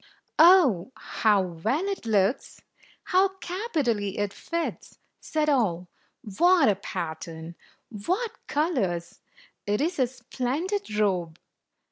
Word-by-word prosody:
"Oh, 310 - +6
how 210 -3 +1
well 185 - -2
it 395 -11 -4
looks! 210 +4 0 0.4
How 380 +1 +2
capitally 295 - -2
it 205 -1 -1
fits!" 335 0 -5 0.2
said 310 -1 -1
all. 190 - +1 0.2
" 205 -6 -13
What 350 -4 +5
a 205 - +3
pattern! 165 -3 -6 0.5
What 420 +5 0 0.2
colors! 235 - -1 0.5
It 205 +1 +1
is 335 +2 -1
a 255 - +3
splendid 260 - -3
robe!" 180 -6 0
245 Hz, 110 wpm, -26 LUFS, -, 0.5 s, Oh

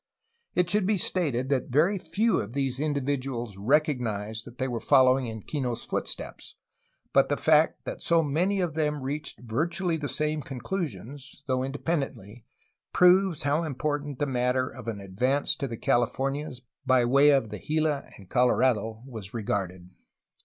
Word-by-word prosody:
It 180 -1 +3
should 205 +1 +1
be 210 -1 +2
stated 140 -9 0
that 135 -3 0
very 165 +10 +3
few 220 +5 +1
of 105 +3 -5
these 135 -2 -1
individuals 135 -6 -2
recognized 115 - 0
that 120 +1 -12
they 130 - -1
were 120 -3 -3
following 130 -1 +4
in 110 -1 -7
Kino's 125 -6 -3
footsteps, - - -4 0.6
but - - +4
the - - +1
fact - - +3
that - - -6
so 165 -1 +3
many 180 +7 +1
of 175 -4 -1
them 150 -3 -1
reached 145 +1 -3
virtually 165 +9 -1
the 145 -2 -4
same 155 0 -1
conclusions, 140 - -6
though 130 -1 0
independently, 135 - -4 0.5
proves 180 -2 +4
how 145 +3 +1
important 145 -1 -3
the 145 - 0
matter 125 -1 0
of 125 -3 -10
an 110 -3 -3
advance 125 +9 0
to 140 - -3
the 115 -2 -6
Californias 135 +3 -1 0.2
by 130 -2 +3
way 140 +4 +5
of 135 -6 +3
the - - -6
Gila 155 -2 -1
and 100 - -14
Colo 125 +5 +3
rado 110 -3 +1
was 110 -5 -8
regarded. 95 -4 -3
135 Hz, 160 wpm, -27 LUFS, 120-150 Hz, 0.6 s, way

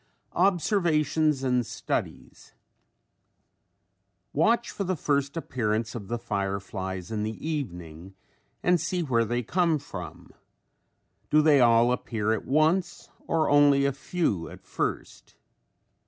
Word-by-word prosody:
OBSERVATIONS 160 - +2
AND 125 -2 +2
STUDIES 110 - -5 1.8
Watch 230 +11 +2
for 200 - -3
the 185 0 -1
first 140 0 -1
appearance 115 -7 -2
of 105 -5 -7
the 120 - -2
fireflies 95 -3 -4
in 110 -2 -2
the 110 +1 -3
evening 90 - -5 0.5
and 180 -3 +3
see 175 +1 -1
where 120 -6 +1
they 120 +2 -1
come 170 +4 +1
from. 95 -11 -9 1.0
Do 155 0 +4
they 150 -3 +5
all 120 0 +5
appear 110 -3 -1
at 110 - -3
once 160 +6 +1 0.2
or 160 -1 +1
only 145 -1 +5
a 140 - +1
few 135 - -2
at - - -13
first? - - -4
135 Hz, 120 wpm, -27 LUFS, 110-160 Hz, 1.8 s, they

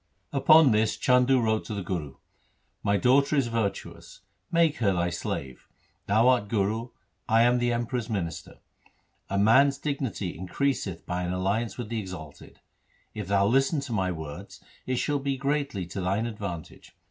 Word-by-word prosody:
Upon 155 0 +6
this 110 0 +1
Chandu 125 +1 +4
wrote 110 -2 +1
to 110 - -5
the 100 - -4
Guru, 80 -7 -4 0.3
' - - -44
My 100 0 +2
daughter 140 +6 +3
is 135 -4 +1
virtuous. 115 -3 -4 0.3
Make 165 -3 +3
her 100 -5 +2
thy 85 -1 0
slave. 65 -6 -5 0.4
Thou 110 +4 +4
art 125 -5 +3
Guru, 110 +3 -1 0.4
I 115 0 +5
am 120 +1 +3
the 120 0 +1
Emperor's 120 0 -2
minister. 90 -7 -4 0.7
A 100 - -1
man's 130 +7 +5
dignity 135 - -3
increaseth 95 - -2
by 90 0 -3
an 90 0 -2
alliance 100 +4 -1
with 120 -4 -5
the 115 -1 -2
exalted. 90 -7 -9 0.5
If 105 -4 -6
thou 100 0 +3
listen 135 +7 +2
to 130 -4 -5
my 95 -3 0
words, 80 -3 -8 0.3
it 130 - 0
shall 145 +3 0
be 135 0 -2
greatly 140 -8 -1
to 90 +3 -6
thine 100 +5 0
advantage. 100 -8 -7
110 Hz, 165 wpm, -27 LUFS, 95-130 Hz, 0.7 s, Upon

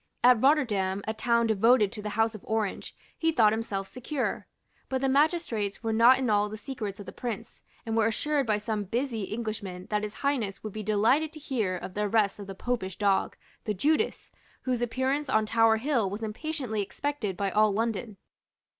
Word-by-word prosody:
At 245 -2 +6
Rotterdam, 210 -10 +2
a 220 - 0
town 235 +1 +2
devoted 220 0 +4
to 215 - -5
the 210 - -4
House 225 0 +3
of 215 - -10
Orange, 220 -2 -2 0.2
he 325 0 +1
thought 220 -8 +4
himself 200 -3 -3
secure. 255 +4 -3 0.4
But 265 - 0
the 270 - +2
magistrates 270 - +1
were 225 -1 0
not 235 +4 +7
in 260 -1 -1
all 210 -1 +2
the 215 - -6
secrets 215 -5 -6
of 205 - -8
the 185 - -8
Prince, 230 0 -6 0.2
and 225 -1 -2
were 225 -1 +3
assured 280 +4 0
by 215 -1 +2
some 210 -1 -3
busy 230 0 -2
Englishmen 205 -5 -4
that 210 0 +1
His 210 0 -5
Highness 230 -9 -1
would 215 -2 -6
be 215 - -4
delighted 220 +9 +2
to 310 - -9
hear 225 -11 -1
of 180 - -7
the 210 +1 0
arrest 210 -2 +2
of 200 - -8
the 195 - -7
Popish 190 -4 -3
dog, 200 -2 +1 0.3
the 210 - -1
Judas, 310 - 0 0.3
whose 250 -2 -1
appearance 260 +4 -1
on 220 -4 +3
Tower 225 0 +4
Hill 235 -4 +1
was 205 +3 -5
impatiently 235 -1 -3
expected 210 -2 -3
by 200 -1 -1
all 215 +1 +4
London. 220 0 -2
220 Hz, 195 wpm, -28 LUFS, 205-255 Hz, 0.4 s, not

